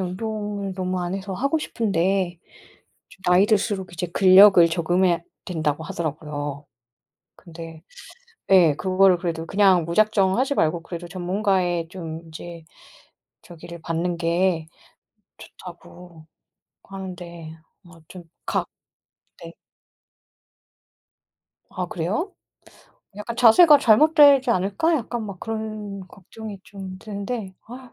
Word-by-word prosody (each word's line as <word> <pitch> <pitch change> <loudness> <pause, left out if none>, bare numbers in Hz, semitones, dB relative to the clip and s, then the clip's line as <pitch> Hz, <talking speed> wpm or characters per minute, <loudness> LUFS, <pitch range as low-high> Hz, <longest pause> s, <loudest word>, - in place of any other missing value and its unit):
운동을 205 +1 -4
너무 185 -1 -3
안 175 +1 -3
해서 195 0 -6
하고 275 +10 0
싶은데 190 - -1 0.7
좀 190 - -20
나이 180 +2 +4
들수록 200 -3 -1
이제 175 +1 -4
근력을 185 0 +7
저금해야 175 +1 +1 0.2
된다고 160 -3 -2
하더라고요. 145 -3 -5 0.7
근데 165 -2 -11 0.7
예, 175 -6 +6
그런 185 -1 -3
거를 190 -2 +5
그래도 165 -2 -4
그냥 190 -2 +3
무작정 195 +3 +2
하지 270 +2 0
말고 165 - 0
그래도 175 0 -8
전문가의 180 -2 -1
좀 165 -3 -7
인제 165 0 -10 0.8
저기를 170 0 -12
받는 170 +2 -2
게 170 0 0 0.7
좋다고 175 -2 -14 0.6
하는데 175 -4 -9 0.3
뭐 175 -1 -17
좀 180 -2 -11 0.2
각 - - -1 0.8
네. - - -9 2.2
아 180 - -4
그래요? 190 - -3 0.8
약간 210 +3 -6
자세가 290 +7 +7
잘못되지 280 +1 +5
않을까? 205 - +1
약간 240 -4 -3
막 200 -3 -9
그런 215 -3 -6
걱정이 200 +2 -11
좀 190 -2 -10
드는데 200 0 -6
아 250 +1 -11
185 Hz, 235 characters per minute, -23 LUFS, 170-210 Hz, 2.2 s, 근력을